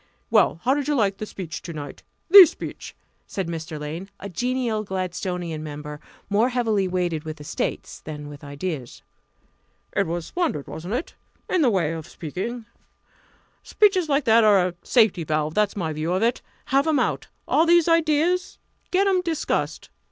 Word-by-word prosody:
"Well, 165 - +3
how 260 - +3
did 285 -1 -2
you 295 - +1
like 200 -6 +1
the 215 - -5
speech 180 -6 -7
to 170 - -7
night 145 -2 -8 0.3
the 380 -1 +11
speech?" - - -8 0.3
said 190 -4 -3
Mr. 160 -2 -5
Lane, 160 +6 -6
a 200 - -7
genial 240 +2 -1
Gladstonian 180 -4 -3
member, 150 0 -7 0.3
more 215 +5 +2
heavily 225 -6 +1
weighted 175 -4 -1
with 155 -1 -7
estates 150 +1 -4
than 150 -1 -8
with 145 +1 -11
ideas. 145 -2 -6 0.9
"It 200 - +2
was 170 0 -3
splendid, 330 - -2
wasn't 175 +8 -5
it? 300 - -4 0.3
in 365 - +1
the 265 - +4
way 180 -7 +1
of 160 -2 -7
speaking. 220 +9 -5 1.0
Speeches 380 -6 +2
like 280 0 +2
that 230 0 +5
are 195 -4 +5
a 175 - -12
safety 215 -8 +3
valve 155 0 -1
that's 210 +1 +1
my 165 -6 -2
view 155 +3 -2
of 190 +4 +1
it. 235 +2 +1 0.3
Have 275 +3 +4
'em 315 -2 +3
out 255 - -1 0.2
all 325 - +3
these 345 -1 +5
ideas 330 +2 +2 0.3
get 380 +2 +2
'em 380 -2 +3
discussed!" 335 -3 -2
195 Hz, 170 wpm, -24 LUFS, 160-260 Hz, 1.0 s, the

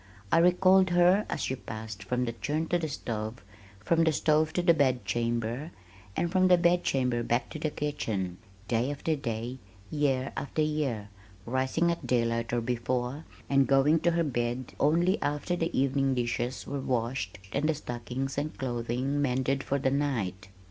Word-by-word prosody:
I - - +5
recalled 185 +2 +5
her 175 +4 +4
as - - -2
she 130 - -1
passed 110 -4 -7
from 125 +5 -1
the 115 - -2
churn 150 +7 -2
to 175 - +2
the 160 - -2
stove, 110 -4 -4 0.4
from 165 +9 +2
the 160 - +4
stove 155 +2 +2
to 180 - 0
the 170 -1 +6
bedchamber, 120 -1 0 0.5
and 170 +1 0
from 185 0 +4
the 180 -1 +6
bedchamber 135 -8 +2
back 120 +2 -1
to 155 - -6
the 155 - 0
kitchen, 105 -12 -3 0.3
day 120 +3 +1
after 145 +2 -1
day, 120 -1 -4 0.3
year 135 -3 0
after 155 +2 -1
year, 140 -9 -1 0.4
rising 130 +7 +1
at 170 - -4
daylight 115 -1 +1
or 120 0 +1
before, 125 +4 -2 0.2
and 135 -2 +3
going 140 +4 +4
to 170 - +2
her 170 0 +2
bed 120 -3 -2
only 170 +7 +3
after 150 +4 -1
the 165 -1 -1
evening 135 0 +2
dishes 120 +1 -2
were 140 0 -3
washed 120 -5 -2 0.2
and 150 +3 +1
the 160 - +2
stockings 125 +2 -4
and 150 +2 -4
clothing 125 +3 -1
mended 135 0 0
for 140 - 0
the 135 -1 +1
night. 115 -10 -1
135 Hz, 170 wpm, -29 LUFS, 120-155 Hz, 0.5 s, the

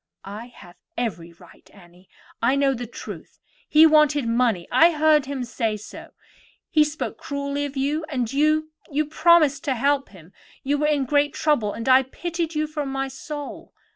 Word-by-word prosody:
"I 210 +4 -8
have 175 -7 -16 0.2
every 180 -8 -4
right, 170 0 -19
Annie; 180 -1 -19 0.3
I 245 +4 +3
know 280 -1 +2
the 245 -1 -6
truth. - - -10 0.3
He 310 +1 +7
wanted 300 -4 +4
money; 230 -6 +1
I 330 - +6
heard 305 -2 +3
him 275 -2 -4
say 230 -3 -2
so. 210 - -12 0.6
He 305 -2 +5
spoke 300 +2 -5
cruelly 280 0 -3
to 270 0 -6
you; 295 +4 -1
and 250 -4 -2
you—you 305 0 0
promised 305 -2 +3
to 270 -3 0
help 275 +3 0
him. 185 -2 -17 0.3
You 285 +1 0
were 300 - +1
in 290 -3 +1
great 290 +1 +1
trouble, 240 -10 +1
and 230 - -6
I 260 0 +6
pitied 335 +4 -4
you 305 0 0
from 300 -2 -4
my 270 - -4
very 270 - -5
soul. 290 +2 -8
280 Hz, 175 wpm, -23 LUFS, 235-300 Hz, 0.6 s, He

